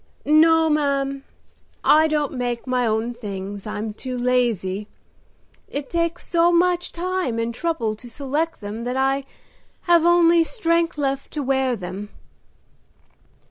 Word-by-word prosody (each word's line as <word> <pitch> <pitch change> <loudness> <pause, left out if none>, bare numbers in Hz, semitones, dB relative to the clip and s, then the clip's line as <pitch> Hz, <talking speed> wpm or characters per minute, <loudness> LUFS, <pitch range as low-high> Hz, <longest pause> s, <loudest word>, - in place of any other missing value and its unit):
"No, 320 +1 +5
ma'am, 275 -2 0 0.6
I 310 +1 +5
don't 300 -2 0
make 245 -2 -3
my 250 -2 0
own 220 +2 -1
things, 200 -3 -7
I'm 210 0 -4
too 255 +3 -5
lazy. 230 -6 0 0.8
It 285 -1 -6
takes 335 0 -1
so 340 0 +3
much 355 0 +2
time 360 -8 -2
and 230 +1 -2
trouble 245 -5 -1
to 240 +2 -10
select 290 +6 -3
them 210 +3 -6
that 250 +1 -2
I 270 +1 +1 0.6
have 345 -2 +4
only 340 -1 +5
strength 335 -5 0
left 275 -1 -2
to 295 - -2
wear 265 -1 +1
them." 195 +1 -7
275 Hz, 135 wpm, -22 LUFS, 235-330 Hz, 0.8 s, No